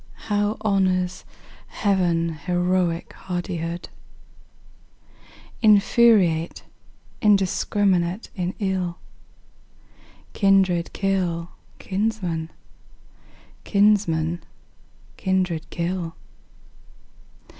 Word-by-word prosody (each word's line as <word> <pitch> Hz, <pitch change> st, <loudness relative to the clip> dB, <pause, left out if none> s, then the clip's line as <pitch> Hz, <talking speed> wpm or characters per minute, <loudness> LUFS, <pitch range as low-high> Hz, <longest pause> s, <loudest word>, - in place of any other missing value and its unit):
How 205 Hz, +1 st, +1 dB
honors 185 Hz, -3 st, 0 dB, 0.4 s
Heaven 175 Hz, -5 st, +1 dB
heroic 175 Hz, +1 st, -1 dB
hardihood! 175 Hz, -1 st, -4 dB, 1.7 s
Infuriate, 205 Hz, -6 st, +4 dB, 0.6 s
indiscrminate 195 Hz, -1 st, +1 dB
in 180 Hz, -1 st, -3 dB
ill, 185 Hz, -4 st, -2 dB, 1.4 s
Kindred 190 Hz, -4 st, +3 dB
kill 180 Hz, -4 st, -1 dB, 0.3 s
kinsmen, 190 Hz, -5 st, -2 dB, 1.1 s
kinsmen 175 Hz, -5 st, +2 dB, 0.8 s
kindred 185 Hz, -4 st, -1 dB
kill. 170 Hz, -1 st, -3 dB
185 Hz, 50 wpm, -23 LUFS, 170-200 Hz, 1.7 s, Infuriate